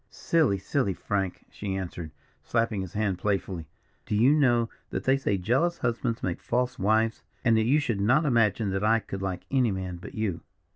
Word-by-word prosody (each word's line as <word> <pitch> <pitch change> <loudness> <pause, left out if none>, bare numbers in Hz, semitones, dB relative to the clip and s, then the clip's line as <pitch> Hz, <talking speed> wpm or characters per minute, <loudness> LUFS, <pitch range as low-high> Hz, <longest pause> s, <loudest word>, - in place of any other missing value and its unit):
"Silly, 155 -12 +1
silly, 100 - -1
Frank!" 95 -3 -2
she 100 -2 -4
answered, 85 -4 -5 0.3
slapping 115 -3 0
his 95 -3 -7
hand 100 -4 -1
playfully. 95 -5 -2 0.4
"Do - - 0
you 120 +7 +5
know 120 -6 +3 0.2
that - - -3
they 130 - +4
say 125 -7 0
jealous 130 - +1
husbands 120 -1 -2
make 90 -2 -2
false 125 +1 -1
wives? 110 +3 +2 0.2
and 115 -2 +5
that 110 0 +3
you 140 +6 +4
should 115 -9 -1
not 135 +10 +3
imagine 115 -5 +2
that 95 +1 -1
I 110 +2 +4
could 95 -3 -6
like 95 -2 -3
any 130 -4 +3
man 95 -2 -4
but 85 - -10
you." 110 -6 -2
110 Hz, 190 wpm, -27 LUFS, 95-120 Hz, 0.4 s, you